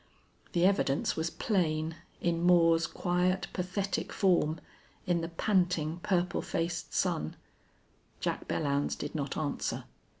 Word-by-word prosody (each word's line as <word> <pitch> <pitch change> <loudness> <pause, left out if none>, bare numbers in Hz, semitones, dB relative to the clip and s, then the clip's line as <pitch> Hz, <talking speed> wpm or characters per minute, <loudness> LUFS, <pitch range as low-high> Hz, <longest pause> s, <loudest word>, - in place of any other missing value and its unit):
The 175 0 +3
evidence 185 -8 +2
was 160 +1 -1
plain, 160 -5 0 0.3
in 170 -1 +1
Moore's 170 -1 +5
quiet, 180 +1 0
pathetic 190 +1 -2
form, 170 -5 +2 0.5
in 175 -3 +1
the 165 - -2
panting, 175 -2 +1
purple 180 -2 +1
faced 165 +1 -2
son. 75 +1 0 0.8
Jack - - -2
Belllounds 140 -1 0
did 145 - -5
not 140 -3 -3
answer. 150 -3 -2
170 Hz, 120 wpm, -31 LUFS, 155-180 Hz, 0.8 s, Moore's